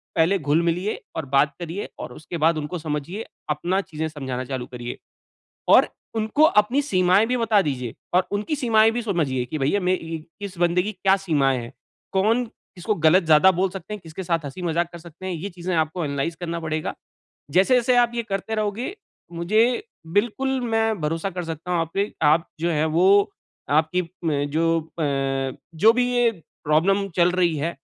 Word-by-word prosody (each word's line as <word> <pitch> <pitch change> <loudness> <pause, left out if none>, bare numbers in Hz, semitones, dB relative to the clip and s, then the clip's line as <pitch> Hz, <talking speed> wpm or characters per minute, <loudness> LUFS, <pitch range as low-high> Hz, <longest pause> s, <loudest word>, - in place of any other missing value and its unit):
पहले 170 +4 +3
घुल 150 +1 +2
मिलिए 180 +5 -1
और 160 - -3
बात 145 +2 +4
करिए 175 +3 -5
और - - -7
उसके 165 +2 -7
बाद 165 +1 +3
उनको 155 +4 -4
समझिए, 155 +7 -4 0.2
अपना 175 +6 0
चीज़ें 160 -4 -4
समझाना 135 -5 -5
चालू 130 -1 -4
करिए। 120 -1 -7 0.7
और - - +7 0.3
उनको 220 +6 +1 0.2
अपनी 255 +7 0
सीमाएँ 185 -4 +3
भी 250 +2 0
बता 225 -3 +3
दीजिए 125 -7 -3 0.2
और 180 +1 +4
उनकी 210 +9 -1
सीमाएँ 225 -5 +4
भी 240 +1 -2
समझिए 155 - 0
कि 155 +5 -4
भैया, 145 +9 +1
मैं 180 0 +1
इ 165 -1 -6 0.2
इस 195 -2 -6
बंदे 175 +1 +3
की 205 - -3
क्या 195 0 +2
सीमाएँ 145 -9 +1
हैं। 120 +2 -9 0.4
कौन 220 +6 +2
किसको 215 -1 -5
गलत 170 +2 +4
ज़्यादा 160 +3 +6
बोल 185 +2 +1
सकते 195 +2 -7
हैं, 210 - -8
किसके 165 +2 -8
साथ 170 -2 0
हँसी-मज़ाक 170 +3 -2
कर 170 - -8
सकते 170 +2 -11
हैं, 190 - -2
ये 175 +4 -5
चीज़ें 180 0 -4
आपको 160 +2 0
एनालाइज़ 140 +3 -2
करना 170 -1 -3
पड़ेगा। 155 -1 -3 0.6
जैसे-जैसे 245 - +4
आप 240 -1 +4
ये 235 - -1
करते 195 +3 -2
रहोगे, 215 - -2 0.4
मुझे 215 - +2 0.3
बिल्कुल 265 +5 +1
मैं 225 -3 0
भरोसा 165 +5 -1
कर 180 -1 -5
सकता 165 +2 -6
हूँ 175 - +2
आप 165 0 -2
पे, 200 +2 0
आप 160 +2 +4
जो 170 +2 0
हैं 155 -1 +1
वो 190 +6 +4 0.4
आपकी 155 +5 +2 0.2
म 160 - +2 0.2
जो 165 +1 +2 0.2
अ, - - +1 0.7
जो 220 +8 +6
भी 250 +1 +2
ये 245 -1 +3 0.3
प्रॉब्लम 195 +7 +2
चल 175 0 +4
रही 175 -3 +2
है, 165 +4 -2
175 Hz, 185 wpm, -23 LUFS, 155-205 Hz, 0.7 s, और